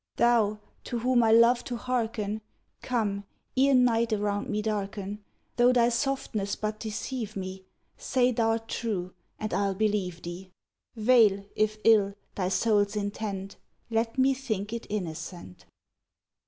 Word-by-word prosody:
Thou, 225 -3 +3 0.3
to 240 - -3
whom 245 +1 +3
I 225 -1 +4
love 235 +2 +6
to 245 -2 -3
hearken, 220 -3 -2 0.4
Come, 210 -5 -1 0.3
ere 270 +1 +4
night 235 -2 +3
around 205 -1 -1
me 210 0 -1
darken; 205 -1 -3 0.3
Though 245 +1 +6
thy 240 -1 +4
softness 235 -5 -1
but 215 0 -3
deceive 220 0 -4
me, 190 0 -6 0.3
Say 255 -1 +2
thou'rt 225 0 0
true, 195 -7 -3 0.2
and 215 - -4
I'll 200 -1 +1
believe 195 -4 -1
thee; 175 +2 -7 0.5
Veil, 215 -4 +4
if 215 0 +1
ill, 205 -3 +5 0.2
thy 185 -2 -1
soul's 205 +1 +2
intent, 200 -1 -4 0.3
Let 225 +1 0
me 265 +1 +4
think 220 -6 -3
it 235 - -5
innocent! 165 - -6
215 Hz, 135 wpm, -28 LUFS, 200-235 Hz, 0.5 s, love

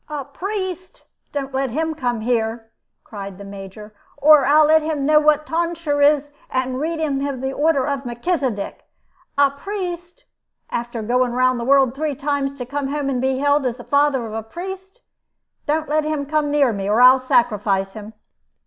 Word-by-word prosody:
"A 290 -3 -4
priest! 370 +3 -5 0.3
Don't 275 -2 -4
let 265 0 0
him 315 +6 -1
come 245 -6 -2
here," 225 -1 -1 0.3
cried 200 -3 -8
the 200 - -10
Major, 200 +2 -10 0.2
"or 290 -1 +6
I'll 305 +2 +6
let 315 +1 +5
him 305 -3 -2
know 305 +1 +5
what 305 0 +3
tonsure 330 -3 -1
is, 290 0 +3 0.2
and 255 0 -1
read 325 +3 -2
him 290 -4 -1 0.2
the 265 +1 -3
order 290 -3 +2
of 280 -2 -2
Melchisedec. 245 - -2 0.6
A 280 -1 +4
priest! 350 +2 -6 0.5
After 240 -1 -4
going 245 +2 +1
round 255 0 +2
the - - -3
world 270 -2 +4
three 295 +1 -2
times, 280 0 -2
to 250 -3 -6
come 280 +2 -3
home 285 0 -2
and 250 -2 -1
be 265 0 0
hailed 285 +1 +2
as 245 -1 -3
the 245 - -10
father 280 -3 +2
of 215 - -7
a 225 - -3
priest! 380 - -8 0.7
Don't 310 +1 0
let 305 +1 +1
him 305 -2 -2
come 300 0 0
near 285 -5 +3
me, 200 -1 -3
or 215 +3 +2
I'll 255 +1 +8
sacrifice 210 -6 +1
him." 215 0 -10
275 Hz, 180 wpm, -21 LUFS, 245-305 Hz, 0.7 s, I'll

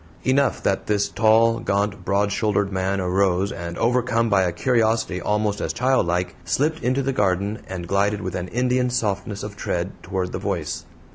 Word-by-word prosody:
Enough 135 +2 +2
that 95 - 0
this 100 -1 +1
tall, 115 +2 +4
gaunt, 100 -1 -1
broad 100 +1 +1
shouldered 100 -1 0
man 95 +1 -1
arose 95 +1 +1
and, 85 -1 -6
overcome 115 -1 +1
by 95 -1 +4
a 90 -2 +1
curiosity 110 -3 +1
almost 105 +1 0
as - - -2
childlike, 90 -9 +1
slipped 150 - 0
into 130 +2 +1
the 135 +1 0
garden 100 0 0
and 90 -2 -6
glided 100 +2 +1
with 95 -1 -4
an 90 0 -3
Indian 125 +3 +1
softness 100 -4 -2
of 105 -1 -6
tread 90 -2 -2
toward 90 0 -3
the - - -4
voice. - - -3
100 Hz, 170 wpm, -23 LUFS, 95-115 Hz, -, tall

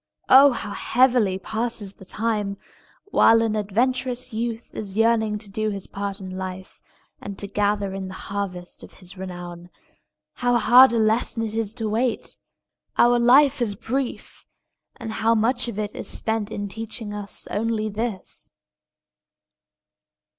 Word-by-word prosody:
Oh, 275 +2 +9
how 215 - -5
heavily 240 -4 +2
passes 220 0 -2
the 190 - -14
time, 210 -1 -2 0.5
while 225 0 +6
an 220 -1 0
adventurous 245 +4 -1
youth 230 +1 -4
is 200 -1 -6
yearning 220 -2 +2
to 205 - -11
do 215 +2 -2
his 200 -2 -4
part 200 0 -5
in 185 -1 -7
life, 185 0 -7 0.4
and 200 -1 -7
to - - -3
gather 205 -1 0
in 195 -1 -5
the 185 - -8
harvest 190 -3 -5
of - - -12
his 180 0 -10
renown! 175 -2 -8 0.6
How 245 -1 +1
hard 245 +3 +7
a 235 - 0
lesson 225 +1 +1
it 220 -1 -3
is 225 -1 -1
to 225 - -3
wait! 230 +3 -1 0.6
Our 240 0 +5
life 260 +3 +5
is 210 -4 0
brief, 250 +5 -4 0.5
and 225 - -6
how 225 +1 +2
much 230 +4 +1
of 235 - -5
it 210 -1 -3
is - - -5
spent 220 -2 -2
in 205 -2 -4
teaching 220 0 -7
us 205 -1 -4
only 215 0 -1
this! 215 -2 -4
215 Hz, 150 wpm, -23 LUFS, 200-235 Hz, 0.6 s, Oh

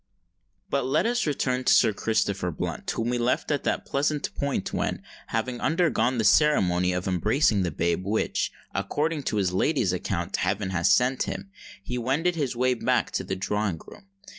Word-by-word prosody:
But 125 - -1
let 145 +9 +2
us 240 -4 0
return 130 -3 0
to - - +3
Sir 110 - +5
Christopher 100 -4 0
Blunt, 80 - -4
whom 115 +2 -1
we 120 - 0
left 120 +5 0
at 145 - 0
that - - -1
pleasant 145 +1 -1
point 140 -8 -2
when, - - -2 0.2
having 125 -2 -2
undergone 150 -8 +1
the 110 - +1
ceremony 95 - +4
of 90 +1 -2
embracing 105 - +2
the 90 - 0
babe 85 +3 -1
which, 105 +3 -1 0.2
according 145 - -1
to - - -3
his 95 -3 +1
lady's 100 - +1
account, 90 0 -2
heaven 100 -1 -1
had 85 -2 +1
sent 125 +1 +3
him, 195 - -6 0.3
he 125 0 -3
wended 150 +9 0
his 140 -6 -2
way 125 +1 +2
back 120 - 0
to - - -2
the 95 - -3
drawing 100 -2 -2
room. 200 - -14
120 Hz, 180 wpm, -26 LUFS, 95-140 Hz, 0.3 s, Sir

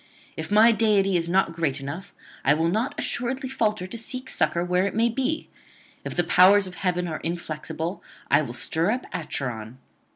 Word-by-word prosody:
If - - -5
my 220 +3 +7
deity 205 -4 +2
is 170 -1 +1
not 185 -1 +2
great 160 -4 -1
enough, 145 +8 -7 0.3
I 145 - +4
will 165 +2 +1
not 220 +9 -1
assuredly 260 +2 -2
falter 215 -7 0
to 185 +5 -7
seek 255 +3 -5
succour 170 +1 +1
where 180 +2 +2
it 200 - -5
may 230 +2 +3
be; 265 +6 -1 0.6
if - - -5
the 175 - +2
powers 195 +3 +6
of 185 - -7
heaven 180 -1 -1
are 160 -2 -4
inflexible, 165 +1 -4 0.3
I - - +4
will 120 -5 -5
stir 165 +8 0
up 250 +4 -1
Acheron. 125 -7 -4
180 Hz, 185 wpm, -25 LUFS, 165-220 Hz, 0.6 s, my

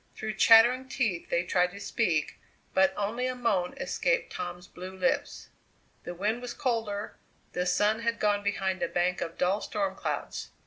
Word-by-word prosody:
Through 215 0 -4
chattering 240 +5 +6
teeth 220 -11 -1
they 170 - +1
tried 180 0 +2
to 200 - -9
speak, 175 -8 -1 0.3
but 190 0 +4
only 225 +5 -1
a 255 - -2
moan 200 -8 0
escaped - - 0
Tom's 175 0 -6
blue 185 +1 -9
lips. 265 +7 -1 0.6
The 175 - -5
wind 215 +6 -1
was 245 -1 -6
colder; 220 -4 -2 0.4
the 180 0 -1
sun 210 +4 +2
had 230 0 -1
gone 205 -1 +2
behind 195 -2 -1
a - - +1
bank 180 +1 0
of 165 - -4
dull 185 +3 +1
storm 195 -3 -2
clouds. - - -4
205 Hz, 170 wpm, -29 LUFS, 180-230 Hz, 0.6 s, chattering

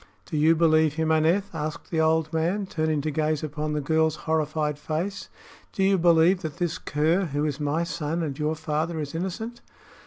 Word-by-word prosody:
"Do - - -6
you 155 +2 +4
believe 155 -2 +3
him, 160 0 0
Aneth?" 170 +6 +2
asked 155 -1 -5
the 160 -2 +1
old 160 0 +1
man, 175 +6 0
turning 155 -4 -1
to 155 +2 -2
gaze 155 0 0
upon 150 0 -3
the 150 - -1
girl's 160 +2 +2
horrified 155 -1 0
face. 170 +7 -3 0.4
"Do 195 - 0
you 195 -1 +3
believe 170 +2 +4
that 160 -2 -5
this 175 0 -2
cur, 160 +6 +1
who 145 -1 -1
is 150 -1 -2
my 150 +3 0
son 165 0 -2
and 145 -3 -4
your 155 +1 0
father, 160 +1 -2
is 145 -1 -5
innocent?" 190 +8 -4
160 Hz, 190 wpm, -25 LUFS, 150-170 Hz, 0.4 s, you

